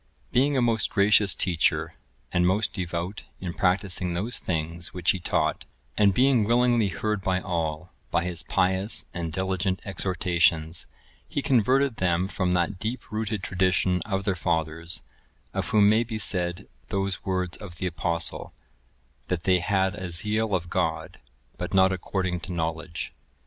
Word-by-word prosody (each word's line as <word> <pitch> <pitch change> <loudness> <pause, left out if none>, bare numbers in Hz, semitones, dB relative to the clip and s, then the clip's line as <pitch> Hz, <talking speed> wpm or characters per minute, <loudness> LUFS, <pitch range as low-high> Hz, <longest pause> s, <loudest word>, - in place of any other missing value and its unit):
Being 140 +3 +3
a 125 - +3
most 115 -3 +2
gracious 100 -1 +4
teacher, 85 -4 +1 0.4
and 90 0 +3
most 100 +4 +1
devout 90 +1 -3 0.2
in 90 -2 -4
practising 90 -1 +1
those 110 +8 -1
things 85 0 -2
which 90 -2 +3
he 95 - -3
taught, 85 - 0 0.3
and 100 -2 +5
being 125 +2 +4
willingly 120 0 +3
heard 100 +3 -2
by 95 0 +1
all, 85 -2 -3 0.2
by 85 - +1
his 90 -2 -1
pious 95 +3 +1
and 85 -2 -3
diligent 95 +1 -1
exhortations, 85 -3 +1 0.4
he 145 - -3
converted 130 0 +3
them 90 0 +1
from 95 -2 -1
that 90 +2 0
deep 110 +3 -4
rooted 110 -2 -2
tradition 90 -1 +1
of 95 -2 -2
their 100 -1 +1
fathers, 80 -1 -2 0.5
of - - -2
whom 105 -2 +5
may 110 +3 +4
be 115 -1 -5
said 90 -4 0 0.2
those 95 -1 -2
words 90 -2 -1
of 95 -5 -10
the 90 - -4
Apostle, 85 0 -2 0.7
"That 90 -2 -2
they 95 -1 +4
had 95 +1 +1
a 95 -3 -5
zeal 105 +4 +1
of 90 -1 -2
God, 80 -3 -2 0.4
but - - -3
not 95 0 +5
according 95 -1 -2
to 95 - -7
knowledge." 80 -1 -3
95 Hz, 155 wpm, -26 LUFS, 85-105 Hz, 0.7 s, and